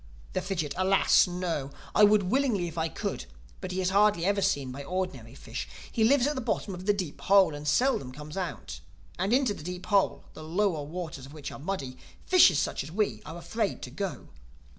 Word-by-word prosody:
The -, -, 0 dB
Fidgit: 165 Hz, -7 st, -2 dB
"Alas! 190 Hz, 0 st, +4 dB
no. 175 Hz, -6 st, -3 dB, 0.2 s
I -, -, +5 dB
would 210 Hz, -1 st, +6 dB
willingly 210 Hz, -3 st, +1 dB
if 165 Hz, -, -8 dB
I 160 Hz, -1 st, -1 dB
could; -, -, -4 dB, 0.3 s
but 185 Hz, -, -5 dB
he 185 Hz, +1 st, -1 dB
is 185 Hz, 0 st, +1 dB
hardly 200 Hz, -3 st, +3 dB
ever 200 Hz, +1 st, +2 dB
seen 145 Hz, -9 st, 0 dB
by 140 Hz, +2 st, -7 dB
ordinary 140 Hz, -9 st, -4 dB
fish. -, -, -6 dB, 0.2 s
He 225 Hz, -, +1 dB
lives 260 Hz, +2 st, +4 dB
at 295 Hz, -, +1 dB
the 260 Hz, -, -3 dB
bottom 220 Hz, -4 st, -2 dB
of 180 Hz, +2 st, -8 dB
the -, -, +6 dB
Deep 185 Hz, -7 st, -5 dB
Hole, 195 Hz, -4 st, +5 dB
and 145 Hz, +1 st, -7 dB
seldom 150 Hz, -, +2 dB
comes 150 Hz, +3 st, -9 dB
out—And 170 Hz, -, -5 dB
into 255 Hz, -3 st, +3 dB
the -, -, -10 dB
Deep 180 Hz, +3 st, -6 dB
Hole, 200 Hz, -2 st, +2 dB
the 155 Hz, -, -10 dB
lower 170 Hz, 0 st, 0 dB
waters 155 Hz, -4 st, -6 dB
of 140 Hz, -, -13 dB
which 150 Hz, -2 st, -7 dB
are -, -, -9 dB
muddy, 140 Hz, -6 st, -4 dB, 0.3 s
fishes 345 Hz, -, +6 dB
such -, -, -1 dB
as 145 Hz, -, -9 dB
we 175 Hz, -, -1 dB
are 160 Hz, +2 st, -7 dB
afraid 195 Hz, +5 st, -2 dB
to 125 Hz, -, -7 dB
go." 165 Hz, -, -5 dB
180 Hz, 205 wpm, -28 LUFS, 150-200 Hz, 0.3 s, would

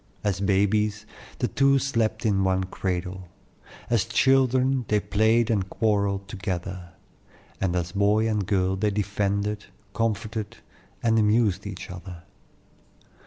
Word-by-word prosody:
As 100 Hz, -2 st, 0 dB
babies, 105 Hz, +1 st, +1 dB, 0.3 s
the 125 Hz, -, 0 dB
two 140 Hz, +6 st, +3 dB
slept 120 Hz, -5 st, -1 dB
in 100 Hz, -3 st, +2 dB
one 95 Hz, 0 st, +1 dB
cradle; 90 Hz, 0 st, -4 dB, 0.6 s
as 115 Hz, -3 st, +2 dB
children 130 Hz, +2 st, +3 dB
they 105 Hz, -, +2 dB
played 110 Hz, +3 st, +2 dB
and 95 Hz, -4 st, 0 dB
quarrelled 100 Hz, -2 st, 0 dB
together; 90 Hz, -2 st, -5 dB, 0.7 s
and 95 Hz, -2 st, 0 dB
as 90 Hz, -1 st, -1 dB
boy 105 Hz, +3 st, +2 dB
and 105 Hz, -4 st, -1 dB
girl 95 Hz, -2 st, +1 dB
they 105 Hz, +2 st, +1 dB
defended, 100 Hz, 0 st, -1 dB, 0.3 s
comforted, 110 Hz, -1 st, -2 dB, 0.5 s
and 115 Hz, -1 st, +3 dB
amused 105 Hz, -2 st, +2 dB
each 95 Hz, -2 st, -7 dB
other. 90 Hz, -1 st, -9 dB
105 Hz, 120 wpm, -25 LUFS, 95-110 Hz, 0.7 s, two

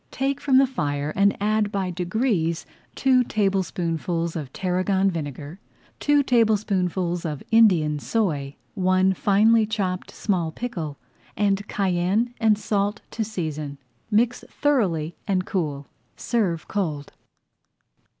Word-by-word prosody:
Take 275 Hz, +1 st, -2 dB
from 265 Hz, -2 st, +3 dB
the 270 Hz, -, +6 dB
fire 145 Hz, -, -2 dB
and 200 Hz, 0 st, +3 dB
add 210 Hz, 0 st, +1 dB
by 190 Hz, -3 st, -1 dB
degrees 180 Hz, -2 st, -1 dB, 0.3 s
two 260 Hz, -2 st, +4 dB
tablespoonfuls 175 Hz, -5 st, -1 dB
of 145 Hz, -5 st, -5 dB
tarragon 190 Hz, +2 st, +1 dB
vinegar, 150 Hz, +1 st, -6 dB, 0.4 s
two 290 Hz, -1 st, +3 dB
tablespoonfuls 195 Hz, -7 st, +1 dB
of 150 Hz, -4 st, -4 dB
Indian 175 Hz, -10 st, +4 dB
soy, 145 Hz, -10 st, -1 dB, 0.2 s
one 185 Hz, -1 st, +2 dB
finely 215 Hz, +4 st, +3 dB
chopped 190 Hz, -4 st, -2 dB
small 175 Hz, -6 st, -1 dB
pickle, 165 Hz, -9 st, -5 dB, 0.4 s
and 205 Hz, 0 st, +1 dB
cayenne 195 Hz, +5 st, 0 dB
and 220 Hz, -2 st, +4 dB
salt 205 Hz, 0 st, -1 dB
to 225 Hz, -, -2 dB
season. 155 Hz, -9 st, -4 dB, 0.3 s
Mix 235 Hz, +3 st, +1 dB
thoroughly 180 Hz, -, 0 dB
and 185 Hz, -2 st, +1 dB
cool. 150 Hz, -8 st, -2 dB, 0.3 s
Serve 190 Hz, -9 st, -1 dB
cold. 155 Hz, -8 st, -3 dB
190 Hz, 115 wpm, -24 LUFS, 165-220 Hz, 0.4 s, the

